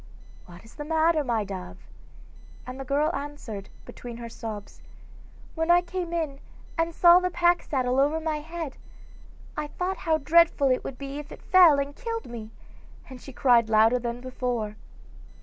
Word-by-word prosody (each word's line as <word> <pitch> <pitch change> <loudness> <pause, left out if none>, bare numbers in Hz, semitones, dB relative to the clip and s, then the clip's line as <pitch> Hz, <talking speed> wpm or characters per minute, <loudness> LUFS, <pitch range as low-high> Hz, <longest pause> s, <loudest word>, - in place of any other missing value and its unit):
'What 175 +4 -14
is 225 - -16
the 295 - -7
matter, 320 0 +2
my 235 -5 0
dove?' 190 -2 -8 0.8
and 255 +1 -8
the - - -4
girl 295 +5 0
answered, 275 -8 -7 0.2
between 240 -1 -9
her 235 -1 -7
sobs: 220 -3 -8 0.7
'When 325 0 -2
I 350 0 +6
came 350 -1 -4
in 315 -5 -2 0.4
and 330 0 0
saw 345 +1 +7
the 365 0 -1
pack 350 0 +2
saddle 255 -2 0
over 295 +3 +2
my 315 -1 -2
head, 325 -2 -6 0.8
I 300 - -3
thought 365 +5 -3
how 320 -4 +1
dreadful 315 -2 +4
it 255 - 0
would 260 - -6
be 275 +1 -6
if 295 - -10
it - - -11
fell 355 -6 +6
and 280 0 -2
killed 460 -2 -4
me,' 230 -3 -8 0.6
and 255 -1 -10
she 275 - -10
cried 240 -3 +3
louder 225 +3 +4
than 240 0 -4
before. 245 -4 -3
280 Hz, 170 wpm, -26 LUFS, 240-330 Hz, 0.8 s, saw